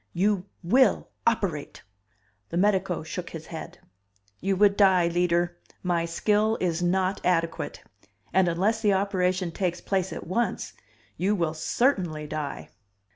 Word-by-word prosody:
"You 190 +1 +1 0.2
will 255 +10 +3 0.2
operate!" 190 -10 -1 0.7
The - - -3
medico 190 -3 +1
shook 170 +2 -5
his 160 -1 -8
head. 170 +1 -8 0.6
"You 195 +1 0
would 200 +1 +4
die, 190 -4 +5
Leader. 175 0 +1 0.2
My 175 -2 +1
skill 210 +6 +1
is 175 -2 0
not 185 +2 +1
adequate. 165 -2 -1 0.5
And 190 -1 +4
unless 195 +7 +1
the 210 -3 +3
operation 185 -2 0
takes 175 0 -2
place 190 -2 -1
at - - -6
once, 215 +3 -1 0.4
you 195 +5 +1
will 170 -4 0
certainly 165 - 0
die." 150 -1 -5
180 Hz, 130 wpm, -26 LUFS, 170-200 Hz, 0.7 s, die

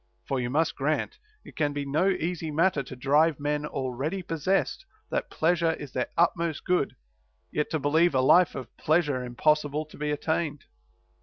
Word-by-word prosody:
For 135 - 0
you 120 -1 -2
must 160 +5 +1
grant, 155 - -1 0.3
it - - -13
can 145 -2 0
be 145 0 -3
no 155 +8 +2
easy 170 -3 -2
matter 160 0 +2
to 130 - -9
drive 145 +4 +3
men 150 +1 -1
already 140 +8 -3
possessed 185 - 0 0.3
that - - -1
pleasure 165 0 +2
is 145 -4 -8
their 125 - -1
utmost 170 -2 +1
good 180 -6 +1 0.6
yet 150 - -1
to 160 - 0
believe 155 +3 +2
a 130 - +4
life 175 +6 +5
of 130 - -8
pleasure 150 -5 +1
impossible 150 +4 +1
to 155 - -15
be 150 0 -1
attained. 150 0 -1
150 Hz, 170 wpm, -27 LUFS, 140-165 Hz, 0.6 s, life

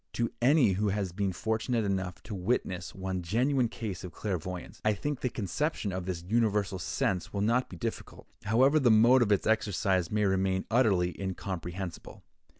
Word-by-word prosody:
To 115 -1 -1
any 135 0 +5
one 95 - +1
who 105 +1 +1
has 100 -2 -1
been 95 +2 -1
fortunate 110 +3 -1
enough 95 -2 -2
to 105 - -7
witness 95 -2 -2
one 95 -1 -3
genuine 125 +8 +1
case 105 -6 -5
of 90 - -7
clairvoyance, 90 -1 -5
I 110 - +3
think 145 +6 -3
the 125 - -1
conception 110 - -2
of 90 0 -4
this 85 -2 -3
universal 105 -3 +1
sense 90 +1 -1
will 100 - -2
not 115 +5 +1
be 90 - -9
difficult, - - -5 0.2
however 130 +8 +4
the 130 -4 +4
mode 115 +4 +6
of 110 -3 +2
its 100 - +2
exercise 95 -5 +1
may 105 0 +1
remain 95 -1 +1
utterly 95 -8 +3
incomprehensible. 95 -1 -5
100 Hz, 175 wpm, -29 LUFS, 95-115 Hz, 0.2 s, mode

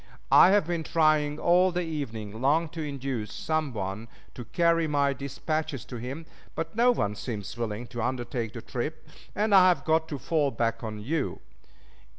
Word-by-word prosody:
I - - +8
have 200 -3 +4
been 170 -1 -2
trying 155 -2 +2
all 180 +3 +4
the 180 0 -1
evening 115 -9 -5
long 155 +5 +2
to 165 +1 -6
induce 135 -7 -4
some 155 +1 -1
one 100 0 -4 0.3
to 120 - -8
carry 170 +2 +2
my 140 -2 +2
dispatches 145 0 -3
to 125 - -7
him, 135 +7 -6 0.3
but 165 +2 -4
no 240 +2 +4
one 105 - +1
seems 105 -2 -5
willing 115 0 -3
to 120 -2 -5
undertake 120 -2 -2
the 115 - -8
trip, 155 +6 -5 0.3
and 210 0 +1
I 185 -2 +8
have 180 - +1
got 160 0 +2
to 145 - -4
fall 150 +1 +1
back 115 -2 -1
on 105 -1 -5
you. 145 +6 -2
145 Hz, 175 wpm, -27 LUFS, 120-165 Hz, 0.3 s, I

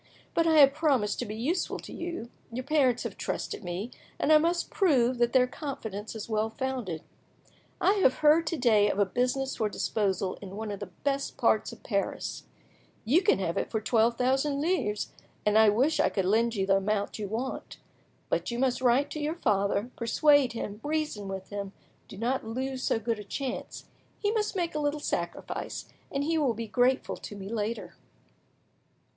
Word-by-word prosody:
But 330 0 +2
I 320 -1 +5
have 275 -2 +8
promised 275 -9 +1
to 245 - -2
be 210 - -5
useful 320 +11 -1
to - - -10
you, 340 -9 -5 0.2
your 250 +3 -4
parents 265 -4 +2
have - - -5
trusted - - -3
me, 185 +7 -4 0.3
and 310 - +3
I 305 - +8
must 340 +2 0
prove 260 -10 +3
that 240 0 +3
their 255 0 +5
confidence 230 -7 -6
is 220 - -6
well 220 0 0
founded. 230 -9 -3 0.8
I 390 - +4
have 260 - +5
heard 310 +3 +4
to 330 - -1
day 220 -5 +4
of - - -1
a 205 - +4
business 255 +6 -1
for 215 - +1
disposal 195 -3 -1
in 195 -1 -8
one 215 0 -4
of 200 - -5
the 205 - -5 0.2
best 275 -1 -1
parts - - +2
of - - -13
Paris. - - -2 0.6
You 290 +11 +4
can 365 - +3
have 170 -3 -2
it - - -3
for 220 - -1
twelve 230 +1 +2
thousand 270 +3 +1
livres, 295 - 0 0.3
and 210 0 +3
I 220 -1 +7
wish 260 +10 +2
I - - +4
could 195 -3 -1
lend 230 +4 +2
you 195 -2 0
the 195 0 +4
amount 200 +2 -1
you 205 - -3
want. 235 +6 -4 0.5
But - - -1
you 235 - -3
must 255 0 +1
write 260 +3 +3
to 305 - -4
your 300 +2 -1
father, 205 - +1
persuade 270 +2 +4
him, 210 -2 -5
reason 300 -9 -2
with 190 -1 -6
him; 200 -1 -5 0.3
do - - -10
not 245 +5 0
lose 260 +3 -3
so - - +1
good 225 0 -2
a - - -6
chance. 260 +6 -5 0.3
He 415 - 0
must 430 -2 -1
make 345 -3 -1
a 305 - -1
little 295 0 0
sacrifice, - - -3 0.3
and 275 0 -1
he 325 +2 +1
will 265 -6 +1
be 230 +1 -4
grateful 250 +4 +1
to 205 - -8
me 195 -1 -7
later." 225 +1 -3
245 Hz, 195 wpm, -29 LUFS, 210-285 Hz, 0.8 s, have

